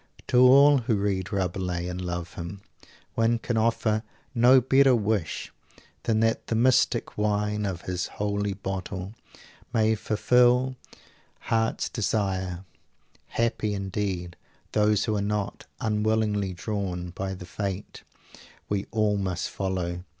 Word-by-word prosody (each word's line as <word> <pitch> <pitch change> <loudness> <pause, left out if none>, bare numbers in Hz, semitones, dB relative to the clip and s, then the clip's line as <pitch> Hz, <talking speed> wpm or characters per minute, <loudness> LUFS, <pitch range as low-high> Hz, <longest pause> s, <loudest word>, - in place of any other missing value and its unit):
To 125 - +4
all 140 +3 +7
who 115 -2 0
read 95 -3 -1
Rabelais 90 -2 -2
and 90 0 -4
love 85 -1 -4
him, 90 +3 -7 0.5
one 115 +1 +2
can 115 +1 -3
offer 110 -1 +1 0.3
no 125 +2 +6
better 135 +1 +5
wish 105 -5 -1 0.5
than 110 -1 +1
that 115 0 +1
the 115 - 0
mystic 125 -2 +2
wine 105 0 0
of 90 -3 -4
his 90 -1 -2
Holy 100 -1 -2
Bottle 95 0 -5 0.6
may 110 -2 +3
fulfil 125 +4 +3 0.2
their - - -18 0.4
heart's 115 0 0
desire. 95 -4 -1 0.6
Happy, 110 -2 -1
indeed, 95 -3 -3 0.3
those 105 -1 +2
who 110 -2 0
are 100 - 0
not 105 0 -3
"unwillingly 105 -2 0
drawn" 90 -3 -3
by 95 +2 -4
the 90 - -9
"Fate" 100 +1 -5 0.7
we 100 -1 -1
all 105 -2 +1
must 95 -3 -2
follow! 90 -2 -3
105 Hz, 130 wpm, -26 LUFS, 95-110 Hz, 0.7 s, all